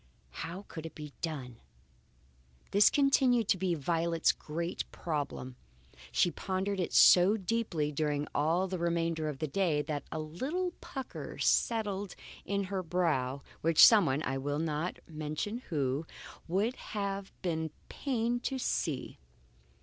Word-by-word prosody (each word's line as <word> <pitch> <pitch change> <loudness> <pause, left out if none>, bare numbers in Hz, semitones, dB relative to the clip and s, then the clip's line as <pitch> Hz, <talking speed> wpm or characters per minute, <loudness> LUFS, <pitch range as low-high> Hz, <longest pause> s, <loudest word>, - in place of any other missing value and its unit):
How 170 - -6
could 165 -1 -6
it - - -13
be 150 -2 -8
done? 135 -8 -4 1.1
This 205 +1 +7
continued 260 -5 +3
to 190 - +4
be 180 -2 +1
Violet's 165 +2 +1
great 170 +3 -4
problem. 145 -5 -4 0.5
She 175 - +3
pondered 190 +2 -2
it 180 - -1
so 185 +4 +7
deeply 190 -7 -1
during 150 0 -1
all 165 +6 +2
the 185 -1 -3
remainder 165 -2 0
of 145 - -5
the 155 - -2
day 155 -2 +1
that 145 -2 -3
a - - -3
little 265 - -2
pucker 265 -2 -7
settled 205 -4 +1 0.3
on 200 0 +1
her 190 0 -2
brow, 155 -7 0 0.2
which 165 -1 +8
someone 160 - +5
(I 135 0 -1
will 145 +2 -2
not 155 +2 -2
mention 155 +8 -4
who) 145 0 -1 0.4
would 205 +8 +1 0.2
have 200 -1 -2
been 160 -3 -1 0.2
pained 240 -3 -1
to 270 - -1
see. 160 - -2
170 Hz, 135 wpm, -31 LUFS, 150-200 Hz, 1.1 s, which